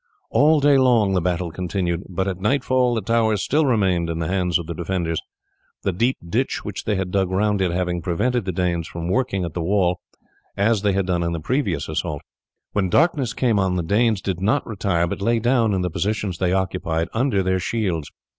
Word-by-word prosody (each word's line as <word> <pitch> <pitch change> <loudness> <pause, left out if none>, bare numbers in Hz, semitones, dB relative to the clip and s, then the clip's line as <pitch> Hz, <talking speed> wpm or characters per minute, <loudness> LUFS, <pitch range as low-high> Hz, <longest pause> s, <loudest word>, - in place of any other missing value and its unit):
All 155 +2 +4
day 140 -1 +5
long 115 -6 +3
the 90 - +2
battle 90 0 -1
continued, 90 0 -2
but 95 +1 -2
at 95 -1 -3
nightfall 130 +1 +2
the 110 - -1
tower 110 0 +2
still 145 +9 +1
remained 95 -8 +1
in 85 - -2
the 80 -1 -2
hands 90 -2 +1
of 85 - -6
the 85 - -5
defenders, 85 -1 -2 0.6
the 95 - +1
deep 120 +8 +1
ditch - - -1
which - - -5
they 105 - +1
had 95 -1 -2
dug 95 -1 +1
round 100 +1 +1
it 95 - +2
having 90 0 -1
prevented 110 +7 0
the 95 - -1
Danes 85 -2 -1
from 85 0 -5
working 95 -4 0
at 85 - -6
the 90 - -3
wall, 90 0 +1 0.6
as 105 +1 +2
they 100 -1 +1
had 95 0 0
done 90 -2 0
in 85 0 -1
the 85 - -3
previous 95 - -1
assault. - - -3 0.5
When 95 -3 0
darkness 140 - +2
came 115 -5 +1
on 95 -1 +1
the 90 - -1
Danes 105 +3 +2
did 95 -2 -3
not 110 +8 +1
retire, 100 -6 0
but 85 - -4
lay 115 +3 +2
down 115 -1 +2
in 95 -2 0
the 90 -1 -2
positions 100 -1 -2
they 90 -1 +1
occupied, 90 -3 -1
under 115 -5 +1
their 95 0 +1
shields. 90 -6 -2
95 Hz, 210 wpm, -22 LUFS, 90-115 Hz, 0.6 s, day